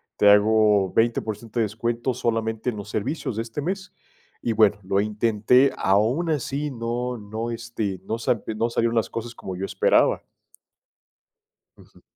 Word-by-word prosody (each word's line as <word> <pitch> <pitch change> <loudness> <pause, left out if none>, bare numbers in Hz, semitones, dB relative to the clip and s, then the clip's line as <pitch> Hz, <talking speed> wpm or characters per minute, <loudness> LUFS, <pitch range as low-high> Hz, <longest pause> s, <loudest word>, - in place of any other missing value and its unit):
te 105 - +5
hago 105 -2 +4
20% 115 0 0
de - - +4
descuento 115 +4 -2
solamente 115 0 -1
en 110 - -4
los 100 +1 -7
servicios 125 +2 -3
de 115 - -1
este 115 +5 -6
mes. 190 +4 -4 0.5
Y 115 - 0
bueno, 105 -2 +4
lo 100 +1 +1
intenté, 110 +5 +3
aún 115 - +2
así 145 0 -1
no 120 +1 -3
no, 110 +3 -5
este, 115 -5 -4
no 110 - -2
sa 115 -1 0
no 115 +2 0
salieron 115 0 0
las 115 - +1
cosas 115 +1 -6
como 95 - -7
yo 95 - -3
esperaba. - - +2 1.5
Ujú. - - -20
115 Hz, 155 wpm, -24 LUFS, 105-120 Hz, 1.5 s, te